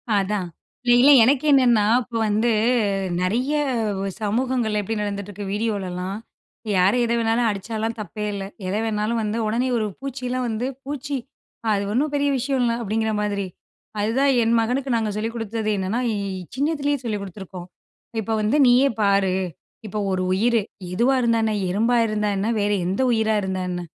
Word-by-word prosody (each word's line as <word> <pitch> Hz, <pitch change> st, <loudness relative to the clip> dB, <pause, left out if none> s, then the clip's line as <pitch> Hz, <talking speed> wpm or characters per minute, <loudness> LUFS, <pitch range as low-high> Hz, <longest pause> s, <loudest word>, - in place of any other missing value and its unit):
அதான். 200 Hz, -1 st, 0 dB, 0.4 s
இல்ல 240 Hz, -, +6 dB
இல்ல 280 Hz, +3 st, +7 dB
எனக்கு 265 Hz, +4 st, +3 dB
என்னன்னா? 240 Hz, -6 st, +5 dB, 0.2 s
இப்ப 235 Hz, -1 st, -5 dB
வந்து 215 Hz, +3 st, +2 dB, 0.7 s
நெறைய 240 Hz, +10 st, 0 dB, 0.7 s
சமூகங்கள்ல 220 Hz, 0 st, 0 dB
எப்படி 220 Hz, +2 st, -3 dB
நடந்துட்டு 200 Hz, -1 st, -4 dB
இருக்கு 205 Hz, +1 st, -7 dB
வீடியோலலாம், 195 Hz, -3 st, -2 dB, 0.6 s
யாரு 190 Hz, +6 st, +4 dB
எதை 235 Hz, 0 st, +1 dB
வேணாலும் 230 Hz, +1 st, +2 dB
அடிச்சாலாம் 220 Hz, +3 st, -3 dB
தப்பே 210 Hz, +1 st, -5 dB
இல்ல. 200 Hz, -1 st, -4 dB, 0.2 s
எத 190 Hz, -, -1 dB
வேணாலும் 220 Hz, +1 st, -1 dB
வந்து 210 Hz, +1 st, -2 dB
உடனே 235 Hz, +4 st, 0 dB
ஒரு 220 Hz, -, 0 dB
பூச்சியில 255 Hz, -1 st, -4 dB
வந்து 230 Hz, +2 st, -2 dB, 0.2 s
"பூச்சி 285 Hz, 0 st, -3 dB, 0.6 s
அது 200 Hz, -1 st, 0 dB
ஒண்ணும் 285 Hz, +5 st, +1 dB
பெரிய 285 Hz, 0 st, +2 dB
விஷயம் 260 Hz, +1 st, 0 dB
இல்ல" 235 Hz, -1 st, +2 dB
அப்டிங்கிற 220 Hz, 0 st, -1 dB
மாரி. 200 Hz, -2 st, -1 dB, 0.5 s
அதுதான் 250 Hz, +7 st, +2 dB
என் 230 Hz, +1 st, +2 dB
மகனுக்கு 250 Hz, +4 st, -1 dB
நாங்க 220 Hz, -2 st, 0 dB
சொல்லிக் 225 Hz, +2 st, -3 dB
குடுத்தது 225 Hz, -1 st, -3 dB
என்னன்னா? 195 Hz, +5 st, -1 dB
இ -, -, -1 dB, 0.4 s
சின்னதுலேயே 290 Hz, 0 st, 0 dB
சொல்லிக் 215 Hz, -4 st, -2 dB
குடுத்துருக்கோம். 190 Hz, -2 st, -9 dB, 0.5 s
"இப்ப 220 Hz, +1 st, -1 dB
வந்து 215 Hz, +7 st, +2 dB
நீயே 250 Hz, +3 st, +5 dB
பாரு. 200 Hz, -2 st, +3 dB, 0.5 s
இப்ப 215 Hz, -, -5 dB
ஒரு 185 Hz, -1 st, 0 dB
உயிரு. 230 Hz, +4 st, +2 dB, 0.3 s
எதுவா 245 Hz, +8 st, +3 dB
இருந்தா 230 Hz, -1 st, +2 dB
என்ன? 220 Hz, -1 st, +1 dB, 0.2 s
எறும்பா 225 Hz, +6 st, +2 dB
இருந்தா 210 Hz, -1 st, 0 dB
என்ன? 200 Hz, +3 st, -1 dB
வேறு 205 Hz, 0 st, +1 dB
எந்த 190 Hz, +6 st, -1 dB
உயிரா 220 Hz, -1 st, +2 dB
இருந்தா 190 Hz, -1 st, -2 dB
என்ன? 175 Hz, 0 st, -3 dB
220 Hz, 160 wpm, -23 LUFS, 205-245 Hz, 0.7 s, இல்ல